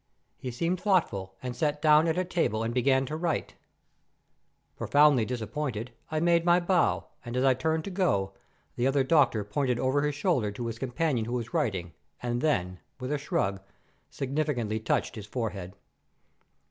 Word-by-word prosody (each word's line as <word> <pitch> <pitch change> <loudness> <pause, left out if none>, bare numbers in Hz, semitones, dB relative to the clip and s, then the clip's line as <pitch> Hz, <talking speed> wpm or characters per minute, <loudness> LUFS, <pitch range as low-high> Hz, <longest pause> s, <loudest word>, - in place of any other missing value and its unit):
"He 130 - -5
seemed 170 +9 -1
thoughtful, 110 - +1
and 125 -1 -4
sat 150 +2 0
down 155 +1 +5
at 160 +1 0
a 185 - +1
table 165 - 0
and 115 +1 -2
began 130 +2 +3
to 150 +4 -4
write. 165 0 -2 1.2
Profoundly 145 -5 +4
disappointed, 125 0 -3 0.2
I 155 - -1
made 170 0 +3
my 175 0 +5
bow, 175 0 +2 0.2
and 120 0 -5
as 130 - +2
I 135 -1 +5
turned 160 +4 -1
to 200 - -6
go, 100 - +1 0.4
the 120 - +2
other 135 0 +2
doctor 130 -6 +3
pointed 125 +4 0
over 130 +3 +2
his 150 -1 0
shoulder 145 - +1
to 120 +3 -5
his 115 -1 -4
companion 130 -2 0
who 120 - -4
was 120 +2 -3
writing, 95 - -1 0.3
and 120 0 -2
then, 90 - 0 0.2
with 130 +2 -4
a 150 - 0
shrug, 95 -9 -1 0.5
significantly 135 -6 -1
touched 110 - 0
his 105 -2 -8
forehead. 105 -6 -4
130 Hz, 170 wpm, -28 LUFS, 115-155 Hz, 1.2 s, down